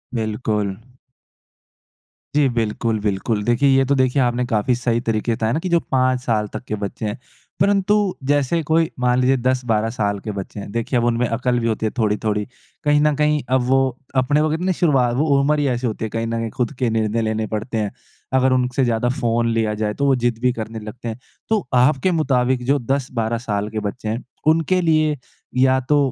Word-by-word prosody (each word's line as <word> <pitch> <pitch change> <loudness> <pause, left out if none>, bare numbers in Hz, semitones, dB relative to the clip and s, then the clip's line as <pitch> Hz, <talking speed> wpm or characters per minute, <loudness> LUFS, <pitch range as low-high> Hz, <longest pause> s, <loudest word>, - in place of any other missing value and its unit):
बिल्कुल। 105 -3 -1 1.6
जी, 145 -2 +4
बिल्कुल 115 -1 -1
बिल्कुल। 105 +1 -1
देखिए 120 +4 +3
ये 135 0 +4
तो 140 +2 +2
देखिए 130 +1 +2
आपने 125 0 +1
काफ़ी 115 +1 +1
सही 120 -1 0
तरीके 115 +1 0
से - - +1
बताया 110 0 -1
ना 155 - 0
की 185 - -4
जो 170 -1 +4
5 130 -1 +2
साल 110 -4 0
तक - - -5
के 105 - -2
बच्चे 100 +1 -5
हैं। 105 0 -3 0.4
परन्तु 200 +1 +3 0.3
जैसे 145 +3 +2
कोई 160 +1 +2
मान 125 0 +2
लीजिए 130 +1 +3
10-12 120 -3 0
साल 100 -3 -1
के 105 - -5
बच्चे 100 +1 -6
हैं, 100 - -7
देखिए 115 +3 -1
अब 120 - 0
उनमें 120 +1 +1
अकल 120 +2 0
भी 115 - -1
होती 110 0 -1
है 110 - 0
थोड़ी-थोड़ी। 105 -1 0 0.4
कहीं 145 0 +3
न 150 0 +3
कहीं 150 0 +2
अब 130 0 +3
वो 130 -1 +2 0.2
अपने 145 +4 +2
को 155 - +2
कितने 180 +4 0
शुरुवात 135 -9 +2
वो 150 +5 +1
उम्र 150 +2 +2
ही 145 - +1
ऐसी 125 -1 0
होती 110 0 -3
है - - -4
कहीं 115 +1 -2
न - - -4
कहीं 115 0 -2
खुद 125 0 -2
के 125 -3 +1
निर्णय 110 0 0
लेने 110 0 -1
पड़ते 110 +2 -3
हैं। 105 -2 -1 0.4
अगर 130 0 +3
उनसे 125 +1 +1
ज़्यादा 120 0 +1
फ़ोन 115 -1 +1
लिया 110 -2 0
जाए 105 -1 0
तो 140 - -1
वो 135 -1 +4
ज़िद 120 -2 0
भी 125 - +3
करने 110 -1 -6
लगते 110 +3 -8
हैं। 115 +1 -5 0.3
तो 215 - 0
आपके 135 +7 +3
मुताबिक 130 -6 +1
जो 140 +3 +2
10-12 125 -3 -1
साल 105 -3 -2
के 110 0 -3
बच्चे 105 +2 -4
हैं 115 +3 -3 0.2
उनके 165 +3 +3
लिए 155 -2 +2 0.4
या 130 0 +4
तो 150 - +5
125 Hz, 210 wpm, -21 LUFS, 110-135 Hz, 1.6 s, तो